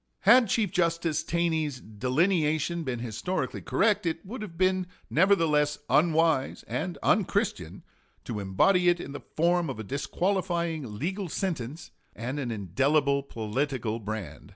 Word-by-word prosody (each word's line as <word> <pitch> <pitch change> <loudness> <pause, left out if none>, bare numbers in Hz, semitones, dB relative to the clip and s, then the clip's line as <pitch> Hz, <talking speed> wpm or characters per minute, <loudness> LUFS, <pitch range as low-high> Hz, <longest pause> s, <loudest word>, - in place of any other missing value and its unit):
Had 235 +4 +6
Chief 210 -5 +1
Justice 170 -4 +1
Taney's 160 -5 -1
delineation 155 - 0
been 130 -6 -3
historically 115 - -3
correct, 205 -3 +1
it 165 +2 -3
would 220 +5 -7
have 175 -6 -8
been 185 -1 +2 0.2
nevertheless 160 -5 +3
unwise 155 -1 +2
and 175 +2 -3
unchristian 195 - 0 0.4
to 115 -4 -4
embody 175 - +3
it 175 0 +2
in 140 - -7
the 145 - -7
form 170 0 +2
of 130 - -5
a - - -4
disqualifying 170 - -2
legal 185 - -3
sentence 155 -3 -4 0.2
and 125 +6 -4
an 130 -4 -3
indelible 140 - +1
political 115 -1 -2
brand. 110 -2 -6
155 Hz, 130 wpm, -28 LUFS, 130-180 Hz, 0.4 s, Had